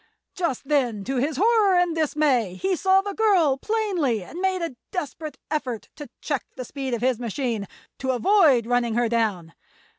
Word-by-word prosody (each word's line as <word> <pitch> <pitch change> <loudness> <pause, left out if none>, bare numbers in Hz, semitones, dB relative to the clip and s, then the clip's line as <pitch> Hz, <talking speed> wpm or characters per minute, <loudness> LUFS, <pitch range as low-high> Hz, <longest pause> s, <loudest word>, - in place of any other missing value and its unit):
Just 330 - -3
then, 245 -8 +1
to 265 +5 -2
his 280 +3 0
horror 420 -2 +4
and 355 -2 +2
dismay, 290 - +1
he 380 - 0
saw 380 +2 +3
the 405 0 -4
girl 380 -10 +3
plainly 355 - -1
and 335 - -8
made 375 -2 0
a 330 -6 -4
desperate 310 -3 -5
effort 255 -7 -3
to 295 -2 -9
check 290 -4 -2
the 255 - -6
speed 265 -1 -3
of 230 - -6
his 250 -2 +1
machine—to 235 +1 -5
avoid 265 - +4
running 240 -1 +1
her 240 0 +2
down. 210 -8 -1
280 Hz, 170 wpm, -24 LUFS, 240-355 Hz, -, horror